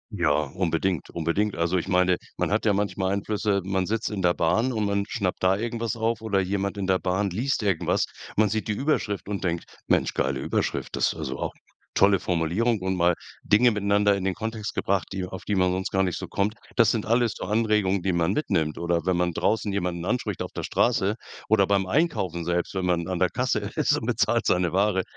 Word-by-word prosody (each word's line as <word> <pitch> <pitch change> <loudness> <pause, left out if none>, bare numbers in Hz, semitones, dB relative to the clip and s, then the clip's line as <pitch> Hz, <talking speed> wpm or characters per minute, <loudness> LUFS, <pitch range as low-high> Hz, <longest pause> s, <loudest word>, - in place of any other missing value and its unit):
Ja, - - +1
unbedingt, 85 +3 -1
unbedingt. 85 +5 0
Also, 85 +2 +1
ich 85 - -2
meine, 90 -1 +3 0.2
man - - -1
hat 105 +2 +1
ja 105 - +4
manchmal 95 -1 0
Einflüsse 100 0 0
man 95 0 0
sitzt 110 +3 -1
in 105 -3 -3
der 90 -1 +3
Bahn 115 +11 +1
und 110 -2 -1
man 100 0 0
schnappt 100 -6 -2
da 95 +1 +4
irgendwas 115 +2 -2
auf 115 0 0
oder 100 -3 +1
jemand 100 +1 -2
in 100 - -2
der 95 -1 +2
Bahn 95 +2 0
liest 115 +6 -1
irgendwas. 95 -5 +1 0.3
Man 105 0 +3
sieht 110 +2 -2
die 105 - 0
Überschrift 105 -6 -1
und 100 -2 -3
denkt, 85 -1 -1 0.2
Mensch, - - +2
geile 65 0 -1
Überschrift. - - -2
Das - - +2
also 70 -5 -5
auch - - -3 0.4
tolle 100 -1 +4
Formulierung 95 +7 0
und 95 0 -1
mal 85 0 +4 0.3
Dinge 120 +4 +5
miteinander 100 -1 +2
in 95 - -4
den 95 - +1
Kontext 110 +1 -4
gebracht, 95 -2 0
die 95 -1 -3
auf 95 0 -8
die 105 - 0
man 90 -1 +3
sonst 95 +1 -2
gar 95 0 +2
nicht 90 -3 -1
so - - -6
kommt. 105 +2 -1 0.2
Das 115 -3 +5
sind 110 -3 -1
alles 115 0 +2
so - - -5
Anregungen, 105 -2 +1
die 95 +1 0
man 85 +1 +1
mitnimmt 85 - 0
oder 85 -1 0
wenn 95 - +2
man 90 0 +1
draußen 105 +4 0
jemanden 90 -3 -2
anspricht 105 -1 -2
auf - - -4
der - - -5
Straße 110 -4 +1 0.3
oder 105 -2 +4
beim 100 -1 +2
Einkaufen 95 - 0
selbst, 85 +1 -1
wenn 95 -1 -1
man 85 -2 0
an 90 -2 -2
der 90 0 +3
Kasse - - 0 0.2
ist - - +3
und - - -4
bezahlt - - +1
seine 90 -1 +2
Ware, 95 0 +2
95 Hz, 215 wpm, -25 LUFS, 90-105 Hz, 0.4 s, Dinge